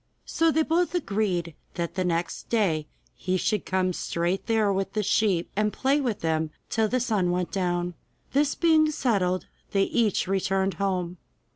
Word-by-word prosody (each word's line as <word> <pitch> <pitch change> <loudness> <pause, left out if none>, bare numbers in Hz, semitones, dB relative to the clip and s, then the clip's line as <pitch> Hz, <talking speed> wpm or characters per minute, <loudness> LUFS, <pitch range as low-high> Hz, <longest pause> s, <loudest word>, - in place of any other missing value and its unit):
So 330 0 +2
they 320 0 +3
both 345 +3 +1
agreed 195 - -1 0.2
that 170 -1 -3
the 185 - -1
next 170 -1 -2
day 170 -10 +1 0.3
he 185 +1 -1
should 210 +2 -1
come 185 -1 +1
straight 175 +3 -2
there 220 -3 +2
with 195 0 -2
the 215 - 0
sheep, 190 -4 +1
and 210 +1 +1
play 275 +5 +1
to 240 -6 0
them 160 -2 -1 0.2
till 220 -1 +2
the 255 +4 0
sun 215 -7 +1
went 180 0 -1
down. 175 -2 -1 0.4
This 285 +1 +2
being 315 -2 +4
settled, 195 -11 0 0.3
they 195 -1 +4
each 215 -3 +1
returned 195 0 +1
home. 180 -2 -1
195 Hz, 165 wpm, -26 LUFS, 180-230 Hz, 0.4 s, being